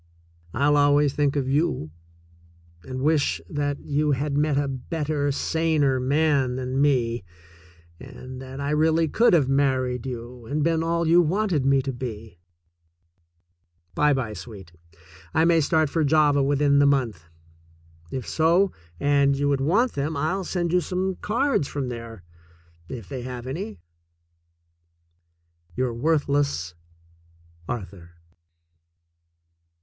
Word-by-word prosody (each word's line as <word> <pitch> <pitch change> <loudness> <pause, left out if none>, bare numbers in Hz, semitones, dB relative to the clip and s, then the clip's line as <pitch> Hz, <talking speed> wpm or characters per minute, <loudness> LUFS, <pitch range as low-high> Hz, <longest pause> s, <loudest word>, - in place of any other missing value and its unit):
I'll 145 +1 +3
always 145 0 +3
think 145 -1 +1
of 140 -3 -1
you, 140 - 0 0.9
and 130 +6 -5
wish 145 - +2
that 145 -1 -2
you 150 0 0
had 140 +2 -2
met 150 -1 +1
a 145 0 +1
better, 145 +2 -2
saner 150 -3 +1
man 140 -1 +1
than 130 +1 -2
me, 120 -6 +1 0.8
and 130 0 -10
that 135 +1 -8
I 140 +1 -2
really 160 +2 +2
could 230 +8 +3
have 150 -6 +4
married 130 -2 0
you 120 -1 -8
and 150 +3 -1
been 165 0 +1
all 170 0 0
you 170 +2 +6
wanted 175 -4 0
me 135 -1 +3
to 135 0 -3
be. 110 -6 -7 1.5
By 150 0 +3
by, 125 -6 -1
sweet. 95 -2 -10 0.6
I 160 +1 +4
may 165 -1 +4
start 155 +1 +2
for 160 +3 0
Java 145 -1 +3
within 140 +1 +3
the 145 - +5
month. 120 - 0 0.8
If 130 +5 -5
so, 170 +4 +3 0.3
and 140 -1 +3
you 145 0 +1
would 140 -1 +1
want 205 - +2
them, 145 +2 -3
I'll 180 +7 -1
send 175 -1 -2
you 180 - +4
some 185 +1 -2
cards 235 - 0
from 135 -3 -4
there 115 -4 -8 0.4
— 85 0 -30
if 100 - -14
they 125 +7 -6
have 125 -1 -7
any. 130 - -5 2.0
Your 125 -2 -1
worthless, 140 - 0 1.0
Arthur. 95 -7 -7
140 Hz, 135 wpm, -24 LUFS, 130-155 Hz, 2.0 s, you